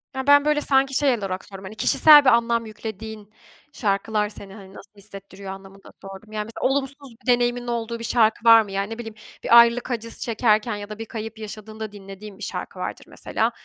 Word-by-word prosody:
Ya, 265 +1 -4
ben 285 0 +6
,böyle, 300 0 +2
sanki 270 -1 +2
şey 275 -1 +2
olarak 190 -2 -5
sordum, 195 -1 -11
hani 200 +3 -9
kişisel 295 +5 +6
bir - - +7
anlam 235 -1 +2
yüklediğin 215 -1 -9 0.4
şarkılar 210 -1 -1
seni, 200 -2 -11
hani, 195 -2 -13
nasıl 200 - -14
hissettiriyor 195 -1 -11
anlamında 195 0 -13
sordum. 195 +2 -11
Yani 210 -1 -4
mesela 225 - -2
olumsuz 275 0 -2 0.2
bir - - -21
deneyiminin 245 0 0
olduğu 235 -1 -3
bir - - -7
şarkı 225 -1 +1
var 230 0 +8
mı? 205 -2 -8
Yani 195 +1 -2
ne - - -9
bileyim 225 -2 -8 0.3
bir 235 - +6
ayrılık 235 +2 +3
acısı 230 -1 -5
çekerken 225 -1 +1
ya 205 0 -8
da 215 0 -8
bir 225 - -5
kayıp 225 0 -7
yaşadığında 215 0 -8
dinlediğin 195 0 -11
bir 215 - -10
şarkı - - -6
vardır - - -6
mesela. - - -2
220 Hz, 200 wpm, -23 LUFS, 205-235 Hz, 0.4 s, var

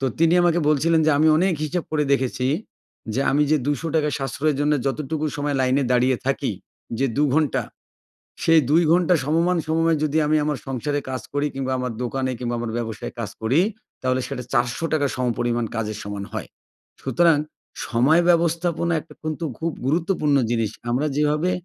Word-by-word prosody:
তো - - -1
তিনি 165 +1 +4
আমাকে 175 -1 +3
বলছিলেন 160 +2 +3
যে, - - +5
"আমি 155 - +4
অনেক 180 +2 +2
হিসেব 165 +4 -2
করে 150 -1 +1
দেখেছি 130 -1 -1 0.7
যে, 135 - 0
আমি 145 +2 +3
যে 155 - +5
৳২০০ 150 +1 0
সাশ্রয়ের 135 +2 -1
জন্য, 145 +1 +2
যতটুকু 155 +2 -2
সময় 145 -1 -1
লাইনে 130 +2 +2
দাঁড়িয়ে 125 +1 +3
থাকি 135 -3 0 0.5
যে, 135 - +1
২ 145 - +3
ঘণ্টা, 155 -3 +1 0.8
সেই 165 -1 +6
২ 165 +4 +5
ঘন্টা 180 +1 +4
সমমান 170 +4 +2
সময়ে 165 +1 +2
যদি 155 0 0
আমি 155 +1 +2
আমার 150 -2 -1
সংসারে 145 +3 -2
কাজ 130 -2 -3
করি, 145 +1 +1
কিংবা 135 -1 -3
আমার 125 -1 -2
দোকানে 130 +1 -2
কিংবা 120 -1 -2
আমার 120 -1 -3
ব্যবসায়ে 115 -3 -5
কাজ 110 -4 -3
করি, 120 +8 +2 0.4
তাহলে 130 0 0
সেটা 125 -3 -5
৳৪০০ 140 +5 +1
সমপরিমাণ 120 -1 0
কাজের 110 -1 -3
সমান 100 -1 -5
হয়।" - - -5 0.5
সুতরাং 155 +4 +3 0.5
সময় 135 +8 +4
ব্যবস্থাপনা 170 0 +1
একটা 165 - -16
কিন্তু 155 +1 -3
খুব 165 +1 -1
গুরুত্বপূর্ণ 155 0 +1
জিনিস। 115 -3 0 0.2
আমরা 130 +5 +1
যেভাবে 150 +4 +1
145 Hz, 165 wpm, -23 LUFS, 130-160 Hz, 0.8 s, সেই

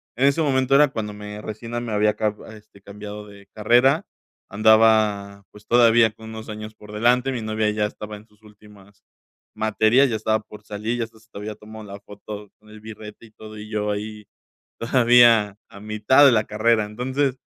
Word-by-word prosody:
En 130 - +1
ese 140 +4 +2
momento 135 -2 +1
era 150 +1 +6
cuando 110 -6 -5
me 105 0 -9
recién 110 +2 -8
me 115 - -5
había 105 0 +1
ca 105 -1 -1 0.2
este 105 -2 -19
cambiado 105 +1 -10
de 100 -1 -16
carrera. 125 - +3 0.4
Andaba, 105 -2 +2
pues, 105 0 -17
todavía 120 -1 +4
con 110 0 -13
unos 110 0 -9
años 110 0 -8
por 105 0 -14
delante. 125 +4 +1
Mi 120 - -4
novia 110 0 -1
ya 105 0 -1
estaba 105 0 -9
en 105 +1 -14
sus 105 0 -30
últimas 105 -2 -19 0.5
materias. 110 +5 +2
Ya 115 - -2
estaba 110 0 0
por 105 - -14
salir, 110 +3 -4
ya - - 0
hasta 110 0 -20
se 110 - -25
había 105 +1 -7
tomado 110 +1 -12
la 100 0 -10
foto 105 0 -10
con 105 0 -22
el 110 0 -13
birrete 110 0 -11
y 110 - -19
todo, 110 0 -12
y 105 0 -9
yo 105 -1 -2
ahí 105 +1 -6 0.6
todavía 115 -4 +4
a 100 - -14
mitad 110 +6 +3
de 135 - +6
la 110 -2 +2
carrera. 110 0 +1
Entonces, 130 +5 -2
110 Hz, 190 wpm, -22 LUFS, 105-115 Hz, 0.6 s, era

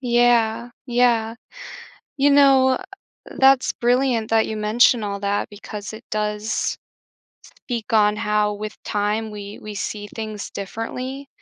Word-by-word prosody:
Yeah. 240 -2 +2 0.2
Yeah. 235 -2 +2 0.8
You 280 +1 +4
know, 275 -2 +6
uh, 260 +8 0 0.5
that's 270 -1 +4
brilliant 245 -2 +1
that 225 -1 +3
you 220 - -4
mentioned 220 +2 +3
all 200 -1 -3
that 200 0 -1
because 210 0 -8
it 220 - -10
does 210 0 -2 0.8
speak 240 -1 -5
on 210 -1 +4
how 210 0 0
with 210 +1 -7
time 210 +2 -1
we 205 0 -8
we 215 -1 -8
see 205 +1 -4
things 215 -2 -5
differently, 255 +7 -6
220 Hz, 130 wpm, -22 LUFS, 210-245 Hz, 0.8 s, know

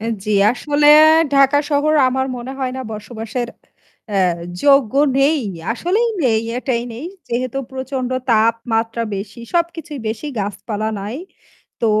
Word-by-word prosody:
অ্যা 225 - -3 0.2
জী, 215 - -3 0.2
আসলে 295 +3 0 0.5
ঢাকা 275 +1 +5
শহর 295 +2 +2 0.2
আমার 265 +1 -1
মনে 250 +2 -6
হয় 255 -1 -2
না - - -4
বসবাসের 225 +2 -5 0.6
অ্যা 200 -2 0 0.4
যোগ্য 275 -4 +4 0.2
নেই। 290 +2 +3 0.3
আসলেই 400 - 0 0.2
নেই 220 -2 +2 0.2
এটাই 245 -2 -1
নেই 255 +9 -7 0.2
যেহেতু 255 +2 -2
প্রচণ্ড 260 -1 -4 0.2
তাপমাত্রা 230 +1 +1
বেশি। 210 +4 -7
সবকিছুই 335 -4 -2
বেশি 225 +7 -4
গাছপালা 210 +2 -3
নাই। 210 +6 -5 0.6
তো 230 - +1
250 Hz, 130 wpm, -19 LUFS, 225-280 Hz, 0.6 s, ঢাকা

